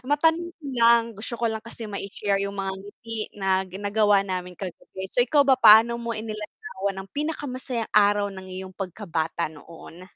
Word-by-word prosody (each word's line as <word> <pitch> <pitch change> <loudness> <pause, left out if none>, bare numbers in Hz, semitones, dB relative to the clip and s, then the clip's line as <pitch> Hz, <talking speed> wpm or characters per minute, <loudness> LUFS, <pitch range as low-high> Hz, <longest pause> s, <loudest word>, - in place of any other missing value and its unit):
matanong 320 +6 +2
ko 320 - -21 0.2
lang 235 0 +7
gusto 220 +3 -5
ko 235 - -3
lang 220 -1 0
kasi 230 0 -9
mai-share 200 -1 -2
'yong 200 0 -3
mga 195 -1 -2
ngiti 205 +4 -9 0.2
na 190 -1 +2
gin 190 +3 -8
nagawa 205 -1 +3
namin 180 -2 -4
kagabi. 190 0 -7
So, 245 - +3
ikaw 285 +4 +4
ba? 270 -1 +6
Paano 225 +2 +8
mo 235 0 -4
inilarawan 215 - -5
ang - - -19
pinakamasayang 260 -6 -3
araw 205 0 +4
ng 190 - -8
iyong 185 0 -7
pagkabata 170 -4 -3
noon? 165 +3 -13
205 Hz, 170 wpm, -25 LUFS, 190-235 Hz, 0.2 s, Paano